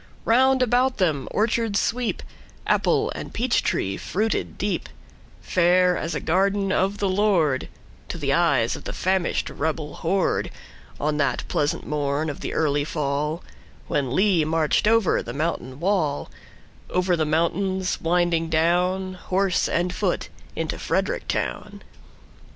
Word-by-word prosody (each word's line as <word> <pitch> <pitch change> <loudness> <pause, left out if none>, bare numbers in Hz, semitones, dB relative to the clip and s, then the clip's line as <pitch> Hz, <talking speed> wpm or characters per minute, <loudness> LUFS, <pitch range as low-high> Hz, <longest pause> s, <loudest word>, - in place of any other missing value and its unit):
Round 260 +2 +4
about 250 +2 +2
them 155 -8 0
orchards 220 -1 +1
sweep, 245 0 -1 0.4
Apple - - +2
and - - -7
peach 240 +1 +1
tree 100 - -1
fruited 215 +4 -2
deep, 200 -3 -2 0.5
Fair 180 0 +3
as 165 0 -3
a - - -1
garden 195 +3 +1
of 195 +1 +1
the 200 - 0
LordTo 185 -8 +2 0.5
the - - -1
eyes - - +2
of - - -10
the - - -4
famished 185 -1 0
rebel 155 0 -3
horde, 185 +3 0 0.5
On 150 +1 0
that 140 -4 0
pleasant 145 0 -1
morn 150 +1 -1
of 140 - -10
the - - -4
early 145 -2 +1
fallWhen 145 -2 -3
Lee 185 +1 +3
marched 155 +4 +1
over 225 -4 +3
the 120 - -7
mountain 140 -3 -3
wall,—Over 180 +1 -2
the 160 - 0
mountains 185 +4 0
winding 170 -1 +1
down, 180 +4 +1
Horse 185 0 0
and 180 +1 0
foot, - - -1 0.3
into - - -3
Frederick - - -1
town. - - -3
180 Hz, 130 wpm, -24 LUFS, 155-195 Hz, 0.5 s, Round